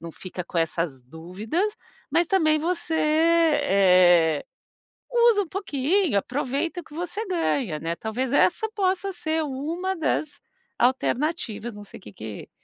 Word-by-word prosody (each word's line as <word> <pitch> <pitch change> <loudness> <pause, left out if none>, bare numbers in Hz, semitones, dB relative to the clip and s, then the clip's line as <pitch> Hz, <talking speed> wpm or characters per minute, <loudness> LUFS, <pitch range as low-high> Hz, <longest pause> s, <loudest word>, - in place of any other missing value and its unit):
não 170 0 -7
fica 185 -1 -7
com 170 - -3
essas 165 -4 -1
dúvidas, 200 - -3 0.4
mas, 335 +3 +2
também, 315 -5 +3
você, 335 +1 -2
eh, 200 - +4 0.7
usa 470 -4 +4
um - - -11
pouquinho, 335 - 0
aproveita 280 - -2
o - - -18
que 305 - -17
você 355 +6 -4
ganha, 285 - -1
né. 165 +1 -3
Talvez 240 +7 -3
essa 440 +9 +3
possa 385 -2 0
ser 320 -2 -1
uma 320 +7 -3
das 310 -3 -2 0.4
alternativas. 255 -2 0
Não 205 - -10
sei 205 - -11
o - - -24
que 105 - -12
que 110 0 -8
290 Hz, 140 wpm, -25 LUFS, -, 0.7 s, eh